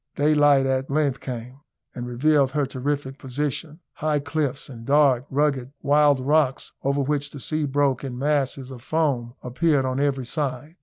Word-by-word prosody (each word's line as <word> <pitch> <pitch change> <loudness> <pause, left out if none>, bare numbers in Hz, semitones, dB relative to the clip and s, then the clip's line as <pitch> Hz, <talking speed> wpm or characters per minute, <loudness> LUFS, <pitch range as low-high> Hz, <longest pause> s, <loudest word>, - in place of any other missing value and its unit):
Daylight 145 -2 +4
at 135 0 0
length 140 -2 +1
came, 125 +1 -7 0.3
and 125 0 -6
revealed 135 +2 +2
her 145 -2 +1
terrific 135 +1 -3
position. 150 +4 -4
High 155 -1 0
cliffs, 145 -2 -2
and 120 -5 -10
dark, 140 -1 +3
rugged, 140 -2 0
wild 145 -1 +4
rocks, 140 0 +1
over 140 +1 0
which 145 +1 -1
the 145 - -9
sea 155 +3 -1
broke 140 -1 +1
in 130 -3 -5
masses 135 -1 -1
of 125 -2 -9
foam, 135 -5 -1
appeared 135 +2 +1
on 130 +1 -1
every 140 -2 0
side. 150 +3 -3
140 Hz, 160 wpm, -24 LUFS, 130-150 Hz, 0.3 s, Daylight